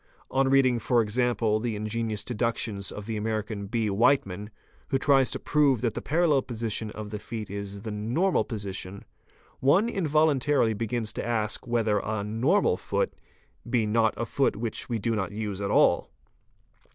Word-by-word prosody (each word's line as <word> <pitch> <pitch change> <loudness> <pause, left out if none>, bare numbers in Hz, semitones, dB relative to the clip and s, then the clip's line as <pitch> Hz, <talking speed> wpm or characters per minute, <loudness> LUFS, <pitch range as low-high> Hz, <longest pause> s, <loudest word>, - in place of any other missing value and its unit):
On 135 0 +2
reading, 130 -3 +4
for 120 +1 +2
example, 115 -1 +1
the 115 -1 -2
ingenious 110 0 -2
deductions 115 -4 -2
of 105 - -7
the 110 -1 -3
American 105 -2 -3
R. 110 -4 0
Whiteman 105 -4 +2
*®, - - -32 0.4
who 135 - +1
tries 135 -1 +3
to - - -1
prove 140 -6 +2
that 115 -3 0
the - - -4
parallel 155 -3 +2
position 115 -3 -3
of 105 -1 -7
the 105 - -4
feet 110 -3 -6
is 100 0 -6
the 110 - -4
'"'normal'' 120 - +1
position, 100 -3 -5 0.5
one 170 - +4
involuntarily 150 - +2
begins 110 +1 -2
to - - -4
ask 115 0 -1
whether 110 -3 +1
a 110 0 -3
"normal" 110 +4 +2
foot - - -1 0.6
be 120 -3 +2
not 110 +1 +2
a 115 - -1
foot 135 +5 +1
which 115 +3 -4
we 120 - 0
do 115 +2 -1
not 95 -3 -2
use 105 -2 -4
at 100 - -2
all. - - +3
115 Hz, 170 wpm, -27 LUFS, 105-125 Hz, 0.6 s, reading